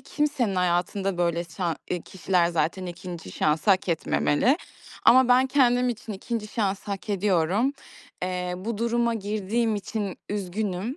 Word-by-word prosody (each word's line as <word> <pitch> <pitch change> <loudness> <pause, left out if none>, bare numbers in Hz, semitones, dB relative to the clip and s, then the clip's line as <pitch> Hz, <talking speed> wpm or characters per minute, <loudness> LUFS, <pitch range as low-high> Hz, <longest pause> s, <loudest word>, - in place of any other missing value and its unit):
kimsenin 280 -9 0
hayatında 180 +1 0
böyle 170 0 +1
şa 170 0 -3 0.3
kişiler 180 -1 +1
zaten 170 +3 -1
2'nci 175 - -7
şansı 155 +6 +1
hak 190 -1 +2
etmemeli. 170 - +2 0.5
Ama 250 +2 +7
ben 255 +1 +5
kendim 250 -2 +3
için 225 -2 -4
2'nci 215 +2 -4
şansı 200 -2 -2
hak 195 +1 -4
ediyorum. 200 - +2 0.5
Eee, 180 0 -2
bu 210 +3 -4
duruma 235 0 +1
girdiğim 215 +2 -1
için 205 -1 -4
üzgünüm. 205 - -3
195 Hz, 130 wpm, -26 LUFS, 180-230 Hz, 0.5 s, Ama